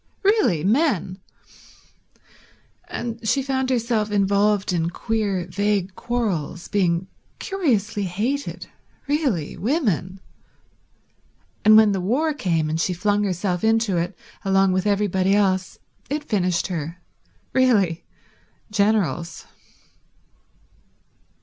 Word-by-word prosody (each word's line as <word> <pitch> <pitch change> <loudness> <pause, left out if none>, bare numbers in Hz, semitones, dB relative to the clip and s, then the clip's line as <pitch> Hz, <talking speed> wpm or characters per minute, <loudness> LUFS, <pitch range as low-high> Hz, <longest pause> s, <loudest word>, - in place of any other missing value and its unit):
Really 395 - +3
men... 205 - +1 1.7
And 230 -1 -5
she 275 - +2
found 265 -1 -1
herself 230 -4 0
involved 200 -1 +2
in 165 -1 0
queer 200 -2 -2
vague 195 +1 -1
quarrels, 190 -9 -3
being 180 -3 +1 0.3
curiously 225 - -1
hated. 230 +11 -3 0.4
Really 275 - 0
women... 200 - -1 1.4
And 215 0 +8
when 220 -1 +6
the 195 -2 -1
war 280 - +1
came, 170 - 0
and 160 +1 -1
she 180 - 0
flung 205 +3 +1
herself 180 -1 -1
into 225 -4 +2
it 170 +2 -2 0.3
along 195 0 +3
with 185 +2 0
everybody 200 -1 +2
else, 190 -2 +1 0.3
it 295 +2 -2
finished 180 -8 0
her. 170 -1 -4 0.5
Really 210 -11 +2 0.7
generals 200 -6 0
200 Hz, 100 wpm, -22 LUFS, 180-230 Hz, 1.7 s, And